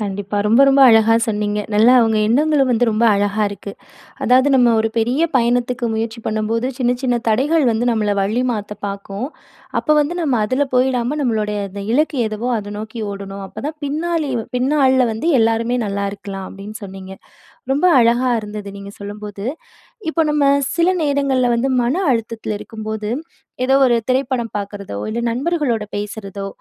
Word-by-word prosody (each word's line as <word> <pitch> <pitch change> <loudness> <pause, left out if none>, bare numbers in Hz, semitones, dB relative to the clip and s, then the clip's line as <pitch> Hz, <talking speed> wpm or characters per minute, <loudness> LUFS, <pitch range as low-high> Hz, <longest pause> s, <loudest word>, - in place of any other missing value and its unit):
கண்டிப்பா. 200 0 -4
ரொம்ப, 230 +5 +4
ரொம்ப 275 0 +4
அழகா 225 -1 +5
சொன்னீங்க. 210 -1 -1 0.2
நல்லா 225 +4 +6
உங்க 225 -1 +1
எண்ணங்களும் 280 +1 +2
வந்து 240 0 +2
ரொம்ப 220 +2 +1
அழகா 205 +1 0
இருக்கு. 200 0 -8 0.5
அதாவது, 260 +3 +4
"நம்ம 240 -2 +4
ஒரு 225 0 +1
பெரிய 245 +7 +1
பயணத்துக்கு 245 0 +1
முயற்சி 225 +1 -3
பண்ணும்போது, 220 +3 -1
சின்ன, 245 -2 +1
சின்ன 250 -2 +1
தடைகள் 280 +8 +2
வந்து 225 +2 -1
நம்மள 210 -2 0
வழி 215 +5 0
மாத்த 210 -2 -4
பாக்கும். 200 +3 -5 0.5
அப்ப 305 - +2
வந்து 295 +4 0
நம்ம 275 -6 +1
அதுல 260 +6 0
போய்டாம, 250 +2 +1
நம்மளுடைய 215 -4 -1
அந்த 200 +1 -7
இலக்கு 300 0 +1
எதுவோ, 215 +3 -4
அத 205 -1 -6
நோக்கி 220 +2 -6
ஓடணும். 195 0 -7
அப்ப - - -9
தான் 310 - -6
பின்னாளி 315 +1 -1 0.3
பின்னாள்ல 260 -1 +3
வந்து 230 +10 -1
எல்லாருமே 230 +2 +1
நல்லா 200 0 -2
இருக்கலாம்." 195 -2 -7
அப்படீன்னு 205 +2 -9
சொன்னீங்க. 190 -1 -9 0.6
ரொம்ப 295 +6 +1 0.2
அழகா 240 +2 +3
இருந்தது 210 -1 -7
நீங்க 200 0 -10
சொல்லும்போது. 205 0 -7 0.7
இப்ப 330 - -1
நம்ம 295 -1 +2 0.3
சில 340 +1 +4 0.2
நேரங்கள்ல 275 -3 +1
வந்து 265 +3 0
மன 245 +5 0 0.2
அழுத்தத்துல 225 -2 -3
இருக்கும்போது, 220 -1 -5 0.5
"ஏதோ 265 +1 +3
ஒரு 240 - +3
திரைப்படம் 255 -3 -1
பாக்குறதோ, 200 - -6
இல்ல 235 +2 -2
நண்பர்களோட 265 -5 -1
பேசுறதோ, 200 -1 -6
230 Hz, 155 wpm, -19 LUFS, 210-260 Hz, 0.7 s, நல்லா